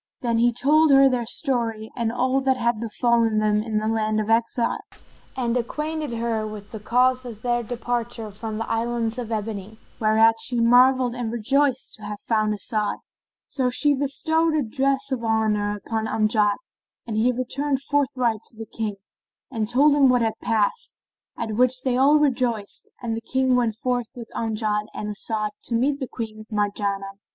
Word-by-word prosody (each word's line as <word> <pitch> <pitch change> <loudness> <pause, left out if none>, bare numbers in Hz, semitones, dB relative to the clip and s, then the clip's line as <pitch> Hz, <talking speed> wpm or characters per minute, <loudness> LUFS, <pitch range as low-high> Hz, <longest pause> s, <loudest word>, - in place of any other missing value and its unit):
Then 235 -3 0
he 240 +1 +4
told 300 +6 +3
her 275 -1 +7
their 245 -3 -1
story 230 -5 0
and 230 -2 -1
all 255 +2 +1
that 265 -1 +1
had 235 -2 0
befallen 230 0 +1
them 210 0 +2
in 220 -1 -2
the 215 0 -1
land 215 -1 0
of 215 +1 -1
exile, 230 +1 +1 0.6
and 240 -2 0
acquainted 300 +3 -3
her 225 -2 -2
with 210 -1 -9
the 220 - -6
cause 250 +4 +2
of 230 -4 -9
their 240 -1 +1
departure 235 -1 -4
from 215 +1 -6
the 225 - -4
Islands 230 0 -1
of 235 -2 -5
Ebony, 215 -1 -4 0.2
whereat 225 +1 +4
she 245 -2 0
marvelled 250 +1 +4
and 240 -2 -3
rejoiced 260 +3 +1
to - - -19
have 210 0 -6
found 215 -2 0
As'ad. 210 0 -2 0.5
So 260 -3 -1
she 290 +4 +3
bestowed 315 +4 +1
a 300 - +1
dress 270 +4 0
of 250 -3 -2
honour 215 -2 0
upon 220 +1 -3
Amjad 215 -1 +2 0.5
and 225 -3 -4
he 230 +4 +3
returned 270 +3 -2
forthright 255 -6 0
to 225 - -17
the 225 - -6
King 215 -2 -4 0.6
and 220 -4 -2
told 285 +4 +4
him 280 -2 +5
what 245 -2 +3
had 225 -1 0
passed, 225 - -1 0.4
at 220 - -3
which 255 +3 +2
they 255 -2 +1
all 275 +4 +5
rejoiced 245 -7 -1
and 225 -1 -2
the 225 - -5
King 260 +2 +1
went 235 -3 +1
forth 245 0 -2
with 235 -2 -9
Amjad 215 -2 -1
and 210 - -4
As'ad 215 0 -2
to 235 - -1
meet 275 +4 0
Queen 215 -2 -7
Marjanah. 200 -2 -2
235 Hz, 175 wpm, -23 LUFS, 215-255 Hz, 0.6 s, her